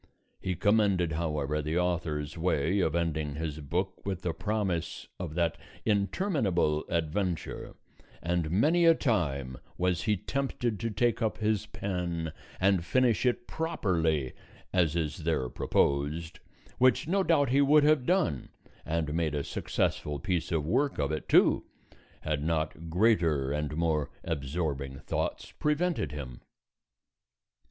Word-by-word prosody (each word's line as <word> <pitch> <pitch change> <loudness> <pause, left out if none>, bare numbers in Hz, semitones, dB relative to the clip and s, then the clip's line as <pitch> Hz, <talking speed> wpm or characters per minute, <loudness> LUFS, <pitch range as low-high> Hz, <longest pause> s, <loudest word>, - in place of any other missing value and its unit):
He 95 - -2
commended 100 -3 +2
however 75 -2 -1
the 75 +3 -1
author's 80 -5 -1
way 85 +2 +1
of 80 -4 +1
ending 80 -4 -1
his 80 -1 -4
book 90 +6 -3
with 95 -2 -3
the 85 - -1
promise 95 -6 -2
of 85 -4 -5
that 85 -2 0 0.3
interminable 100 - +1
adventure; 85 +1 -2 0.4
and 85 -2 -1
many 155 - +3
a 165 0 +7
time 70 - -1 0.2
was 90 -1 +1
he 105 -2 +1
tempted 120 -2 -2
to 115 - -1
take 120 +2 +1
up 110 -1 0
his 110 -2 0
pen 85 -4 -3 0.3
and 95 -2 +3
finish 125 +3 +2
it 120 0 0
properly 80 - 0 0.4
as 85 -4 +2
is 80 +1 -1
there 80 -6 0
proposed, 75 +8 0 0.4
which 130 +4 +4
no 195 +4 +2
doubt 155 -7 +3
he 135 +3 +4
would 145 +1 +6
have 150 -4 +3
done, 175 - +1 0.3
and 80 -2 -1
made 80 -3 0
a 70 - -1
successful 75 +1 -1
piece 85 +2 -2
of 80 -3 0
work 130 - +1
of 70 0 0
it 80 - -4
too, - - +5 0.6
had 75 -2 -1
not 80 0 -2
greater 85 -8 +2
and 75 +1 -2
more 80 -3 +1
absorbing 70 -3 -3
thoughts - - -3
prevented 150 - 0
him. 65 -5 -7
85 Hz, 135 wpm, -29 LUFS, 75-105 Hz, 0.6 s, a